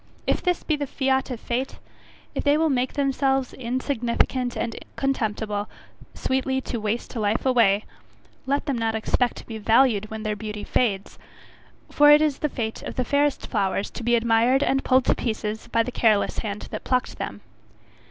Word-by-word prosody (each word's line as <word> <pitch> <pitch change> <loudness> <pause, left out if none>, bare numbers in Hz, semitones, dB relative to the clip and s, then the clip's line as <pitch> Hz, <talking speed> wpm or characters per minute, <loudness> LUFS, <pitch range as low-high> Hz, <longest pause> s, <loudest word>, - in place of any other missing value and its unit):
If - - +1
this 360 -2 0
be 310 - +1
the 290 -1 -3
fiat 265 0 0
of 245 -3 -4
fate, 250 +3 -3 0.6
if - - -3
they 290 0 +4
will 320 -1 +2
make 255 -1 0
themselves 270 -2 0
insignificant 250 0 -1
and 230 -1 -2 0.2
contemptible, 215 -6 -1 0.5
sweetly 265 0 0
to 240 - -4
waste 215 +4 -3
"life 215 +1 0
away," 225 -6 +3 0.6
let 280 +2 0
them 275 -5 -1
not 225 -1 0
expect 240 +2 0
to - - -10
be 225 -1 -7
valued 220 -1 +3
when 220 0 -6
their 215 -1 -1
beauty 210 0 -6
fades, 200 -5 -1 0.7
for 295 0 +6
it 295 0 +9
is 300 -3 0
the 300 - 0
fate 220 -4 -4
of - - -6
the 255 - -1
fairest 285 +2 +1
flowers 200 -2 -1
to - - -7
be 240 +1 +2
admired 235 +4 +3
and 270 -1 +1
pulled 260 -1 +3
to - - +4
pieces 220 -1 -3
by 230 -1 +2
the 250 - -5
careless 220 -4 +2
hand 210 -2 -4
that - - -5
plucked 255 0 -1
them. - - -5
240 Hz, 180 wpm, -24 LUFS, 220-270 Hz, 0.7 s, it